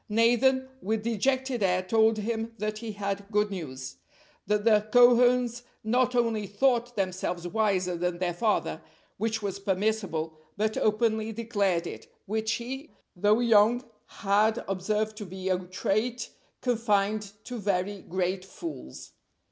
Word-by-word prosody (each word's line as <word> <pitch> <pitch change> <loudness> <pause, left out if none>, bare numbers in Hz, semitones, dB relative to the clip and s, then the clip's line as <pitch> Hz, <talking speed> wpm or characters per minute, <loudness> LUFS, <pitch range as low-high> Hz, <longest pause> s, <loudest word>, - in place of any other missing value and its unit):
Nathan 245 +4 +3
with 215 +2 -1
dejected 255 +2 0
air 185 -1 +2
told 220 +3 +3
him 225 +1 -3
that 215 0 -3
he 225 -2 -5
had 200 0 -3
good 210 0 +2
news; 135 -8 -6 0.5
that 210 0 +1
the 215 -1 +4
Cohens 245 0 +5 0.2
not 250 +3 +2
only 230 -4 +1
thought 245 +3 +1
themselves 185 -2 -2
wiser 190 -3 +1
than 175 0 -1
their 175 -1 -1
father, 215 +5 0 0.4
which 225 -1 -1
was 200 -1 -3
permissible, 190 -5 -1 0.2
but 215 +1 0
openly 220 0 +1
declared 205 -6 0
it, - - -8
which 220 +2 -1
he, 265 +6 -5 0.3
though 210 +5 +3
young, 230 +1 +4 0.2
had 215 +2 +1
observed 210 +3 -1
to 210 - -6
be 190 +1 -5
a 185 -1 +2
trait 215 +6 -2 0.3
confined 215 -4 0
to 245 -2 -6
very 200 0 -1
great 185 +1 -2
fools. 320 - -8
215 Hz, 135 wpm, -28 LUFS, 195-230 Hz, 0.5 s, Cohens